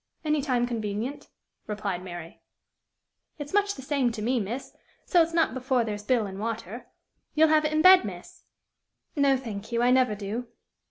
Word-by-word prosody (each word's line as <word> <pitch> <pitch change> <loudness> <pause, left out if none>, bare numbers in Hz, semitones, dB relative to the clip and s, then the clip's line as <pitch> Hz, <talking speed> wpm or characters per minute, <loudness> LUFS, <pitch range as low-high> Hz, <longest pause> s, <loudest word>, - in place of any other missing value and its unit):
"Any 305 -1 +1
time 250 -4 +1
convenient," 230 +3 -4 0.4
replied 205 -4 -3
Mary. 175 -2 -9 1.0
"It's 290 +1 -7
much 405 0 +2
the 265 - -9
same 270 -3 +1
to 220 - -6
me, 250 +2 +1
miss, 230 +6 -5 0.3
so 350 - +4
it's 330 0 +1
not 330 -4 +2
before 260 -1 0
there's 210 -2 -4
bilin' 210 -4 0
water. 225 0 -5 0.5
You'll 315 0 +5
have 310 0 +4
it 305 - 0
in 310 0 +1
bed, 370 -3 +8
miss?" 180 -4 -9 0.7
"No, 280 -2 +3
thank 220 -4 -7
you. 235 0 +1
I 245 - +4
never 255 -4 +3
do." 210 +4 -5
245 Hz, 170 wpm, -27 LUFS, 210-290 Hz, 1.0 s, bed